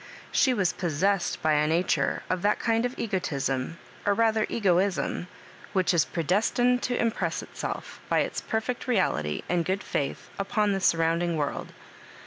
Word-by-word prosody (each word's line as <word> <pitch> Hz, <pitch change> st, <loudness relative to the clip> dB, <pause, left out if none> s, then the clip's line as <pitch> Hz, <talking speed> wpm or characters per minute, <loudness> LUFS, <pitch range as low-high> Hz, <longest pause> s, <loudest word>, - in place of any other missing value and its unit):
She 265 Hz, -, +4 dB
was 195 Hz, -8 st, +1 dB
pos 175 Hz, -4 st, -2 dB
sessed 195 Hz, +4 st, +1 dB
by 150 Hz, -1 st, +3 dB
nature 160 Hz, -3 st, +1 dB
of 185 Hz, -1 st, -1 dB
that 205 Hz, +2 st, +2 dB
kind 230 Hz, +1 st, +2 dB
of 245 Hz, -, -11 dB
egotism 140 Hz, -, -2 dB, 0.3 s
or 205 Hz, -, +2 dB
rather 220 Hz, -1 st, +2 dB
egoism, 190 Hz, -3 st, +1 dB, 0.5 s
which 185 Hz, -2 st, +2 dB
is 165 Hz, -3 st, +4 dB
predestined 225 Hz, +9 st, +1 dB
to 245 Hz, -, -1 dB
impress 230 Hz, -1 st, 0 dB
itself, -, -, -6 dB
by -, -, +3 dB
its -, -, -2 dB
perfect 225 Hz, +3 st, -2 dB
reality 75 Hz, -, 0 dB
and 175 Hz, -1 st, +1 dB
good 190 Hz, +3 st, -1 dB
&ith, 140 Hz, -, -2 dB
upon 210 Hz, +1 st, +1 dB
the 195 Hz, -, 0 dB
sur 170 Hz, -, +4 dB
rounding 165 Hz, +1 st, +1 dB
world. 145 Hz, -2 st, -2 dB
185 Hz, 155 wpm, -27 LUFS, 165-220 Hz, 0.5 s, She